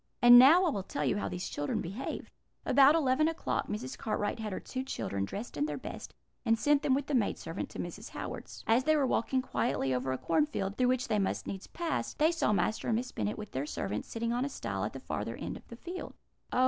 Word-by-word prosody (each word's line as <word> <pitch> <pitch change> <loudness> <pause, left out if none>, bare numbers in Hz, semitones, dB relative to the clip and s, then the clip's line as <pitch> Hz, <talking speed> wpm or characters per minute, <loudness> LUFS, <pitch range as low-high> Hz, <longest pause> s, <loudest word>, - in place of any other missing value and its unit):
"And 240 0 +10
now 320 +9 +8
I - - +3
will 200 - -2
tell 150 -5 -3
you 130 - +1
how 100 0 -2
these 90 0 -4
children 145 +11 -2
behaved. 200 +10 -5 0.3
About 275 +3 +6
eleven 300 -1 +3
o'clock 325 0 -1
Mrs. 135 -11 -4
Cartwright 210 - -2
had 215 -2 -3
her 185 - -3
two 260 0 -5
children 100 - -3
dressed 205 - -6
in 295 - +1
their - - -3
best, - - -8 0.3
and 225 -2 +3
sent 290 +3 +3
them 260 - +3
with 280 0 -1
the 295 - -4
maid 235 -6 +2
servant - - -5
to - - -10
Mrs. - - -6
Howard's. - - -7
As 230 +3 +3
they 310 0 +4
were 290 -3 +3
walking 260 +1 +1
quietly 135 - 0
over 130 +1 -1
a 130 - -1
corn 300 - +2
field, 200 -9 -3
through 250 +1 +2
which 255 +1 +1
they 215 -3 +1
must 195 - -1
needs 195 -1 -6
pass, 335 -3 -3
they 310 +2 +4
saw 330 -10 +1
Master 215 +1 0
and 225 - +2
Miss 245 +3 -2
Bennet 210 - -2
with 210 -2 -7
their 135 +3 -3
servant 105 -5 -3
sitting 230 0 -2
on 245 +1 0
a 280 - -1
stile - - -4
at - - -4
the - - -6
farther - - -4
end - - -5
of - - -12
the 235 - -9
field. 355 +9 -7 0.4
"'Oh!' - - +1
235 Hz, 250 wpm, -31 LUFS, 195-275 Hz, 0.4 s, And